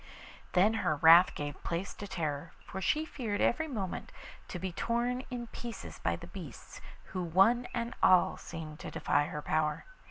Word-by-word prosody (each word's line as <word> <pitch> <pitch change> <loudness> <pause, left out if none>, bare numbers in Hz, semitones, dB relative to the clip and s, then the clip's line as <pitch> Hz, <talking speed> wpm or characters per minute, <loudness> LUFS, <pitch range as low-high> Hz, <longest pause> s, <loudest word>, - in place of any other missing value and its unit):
Then 200 +4 +5
her 155 -4 +1
wrath 165 +4 +7
gave 145 -1 -5
place 170 +3 -3
to 205 - -8
terror, 155 -4 -3
for 190 - -6
she 305 +11 +1
feared 230 -9 -3
every 320 +7 +2
moment 205 - -4 0.4
to - - -5
be 185 +1 -3
torn 240 +6 -1
in 245 -1 -4
pieces 235 0 -8
by - - 0
the - - -9
beasts - - -10 0.3
who 185 - -1
one 195 +9 +4
and 235 0 -3
all 185 -1 +5
seemed 155 -2 -8
to - - -6
defy 145 0 +1
her 150 0 -5
power. 155 -1 0
185 Hz, 170 wpm, -32 LUFS, 165-235 Hz, 0.4 s, wrath